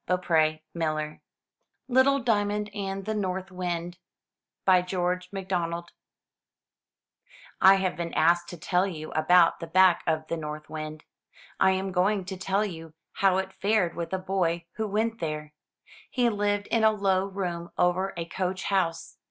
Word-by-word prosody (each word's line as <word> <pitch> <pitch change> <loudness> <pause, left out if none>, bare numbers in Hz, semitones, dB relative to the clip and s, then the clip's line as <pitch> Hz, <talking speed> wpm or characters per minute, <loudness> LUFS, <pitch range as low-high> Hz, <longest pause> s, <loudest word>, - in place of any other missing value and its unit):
421 160 -4 +2
MY 165 -2 0
BOOK 150 0 -3
HOUSE - - -23 0.7
LITTLE 265 +2 +4
DIAMOND 210 -2 0
AND 195 -1 -4
THE 220 - -1
NORTH 190 -2 -3
WIND* 175 -1 -4 0.9
George 180 0 -1
MacDonald 175 -3 -3 1.7
HAVE 190 -1 +5
been 170 -1 -3
asked 170 +2 +3
to 175 - -8
tell 180 +4 +1
you 155 -4 -6
about 165 +2 +4
the 165 - -6
back 185 +1 +5
of 155 -1 0
the 165 - -2
North 150 0 -7
Wind. 155 0 -6 0.6
I 190 - +5
am 190 0 -2
going 190 +2 +1
to 190 - -5
tell 195 +3 0
you 165 -5 -8 0.2
how 190 -1 +3
it 190 0 -3
fared 200 -4 +1
with 170 -1 -4
a 190 - 0
boy 180 -3 -1
who 220 -1 -1
went 220 +2 -1
there. 150 -2 -4 0.6
He 250 - -1
Uved 205 -3 +1
in 230 -1 +2
a 220 - +7
low 195 -2 +1
room 180 -3 -4
over 185 +2 +2
a 165 - -3
coach 185 +2 -3
house. 180 -4 -1
185 Hz, 155 wpm, -27 LUFS, 170-195 Hz, 1.7 s, a